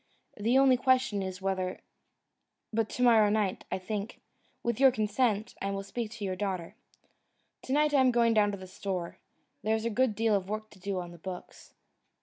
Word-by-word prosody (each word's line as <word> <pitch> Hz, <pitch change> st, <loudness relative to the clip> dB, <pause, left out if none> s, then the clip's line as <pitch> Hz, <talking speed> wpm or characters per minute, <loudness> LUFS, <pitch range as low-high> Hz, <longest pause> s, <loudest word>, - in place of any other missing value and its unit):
The 230 Hz, +5 st, +2 dB
only 270 Hz, -2 st, +6 dB
question 255 Hz, -5 st, +2 dB
is, 190 Hz, 0 st, -5 dB
whether 185 Hz, -1 st, -1 dB, 0.9 s
But 220 Hz, 0 st, 0 dB
to 250 Hz, -, -2 dB
morrow 225 Hz, -4 st, +6 dB
night, 205 Hz, -3 st, 0 dB
I -, -, 0 dB
think, 205 Hz, +3 st, -5 dB, 0.4 s
with 235 Hz, -1 st, -1 dB
your 270 Hz, 0 st, +8 dB
consent, 215 Hz, -1 st, 0 dB
I 195 Hz, -, -1 dB
will 195 Hz, 0 st, -3 dB
speak 225 Hz, +2 st, -4 dB
to 215 Hz, -3 st, -5 dB
your 185 Hz, -1 st, -2 dB
daughter. 185 Hz, -2 st, -3 dB, 0.9 s
To -, -, -7 dB
night 300 Hz, +1 st, +3 dB
I 280 Hz, -, +5 dB
am 260 Hz, -, +5 dB
going 235 Hz, -1 st, +3 dB
down 210 Hz, -2 st, +4 dB
to 200 Hz, -, -5 dB
the 185 Hz, -, -9 dB
store; 185 Hz, -2 st, -5 dB, 0.4 s
there 220 Hz, +1 st, +1 dB
is 220 Hz, 0 st, -3 dB
a 230 Hz, -, 0 dB
good 240 Hz, 0 st, +2 dB
deal 225 Hz, 0 st, +2 dB
of 195 Hz, -1 st, -2 dB
work 215 Hz, 0 st, -4 dB
to -, -, -16 dB
do 195 Hz, 0 st, -3 dB
on 175 Hz, -1 st, -6 dB
the 170 Hz, -, -13 dB
books." 180 Hz, +1 st, -9 dB
210 Hz, 200 wpm, -30 LUFS, 195-235 Hz, 0.9 s, your